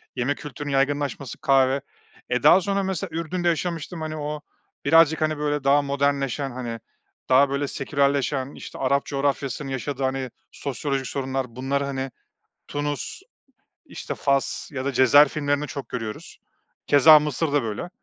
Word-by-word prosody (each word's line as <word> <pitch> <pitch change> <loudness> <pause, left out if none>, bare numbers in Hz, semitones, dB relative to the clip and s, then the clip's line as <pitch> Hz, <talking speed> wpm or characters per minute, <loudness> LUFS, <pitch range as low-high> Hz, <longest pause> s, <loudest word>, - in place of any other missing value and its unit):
yeme 130 +3 0
kültürünün 145 0 -7
yaygınlaşması 140 -1 -1
kahve. 135 -1 +3 0.5
Eee, 125 0 0
daha 190 - +7
sonra, 200 0 0
mesela, 190 -3 -3
Ürdün'de 175 +2 -2
yaşamıştım, 170 0 -2
hani, 155 0 -4
o 150 0 -4 0.4
birazcık, 165 -1 +5
hani, 155 -1 +1
böyle 150 -1 -1
daha 140 +1 +4
modernleşen, 140 -1 -1
hani, 120 -2 -5 0.5
daha 135 +2 +5
böyle 140 +1 -1
sekülerleşen 140 -1 0
işte - - -9
Arap 140 +1 +1
coğrafyasının 140 -1 -2
yaşadığı, 135 +1 -3
hani, 130 -1 -1 0.2
sosyolojik 135 -1 -3
sorunlar 130 -3 -3
bunları, 135 +2 -1
hani, 135 -1 -4 0.6
Tunus, 145 -3 -4 0.7
işte, - - -6
Fas 140 -1 0
ya 130 -1 -4
da 140 - -1
Cezayir 140 +4 +7
filmlerinde 145 0 -1
çok 140 -2 -7
görüyoruz. 115 -3 -6 0.5
Keza 150 +2 +8
Mısır'da 145 -1 0
böyle. 110 +10 -4
140 Hz, 140 wpm, -24 LUFS, 135-150 Hz, 0.7 s, Keza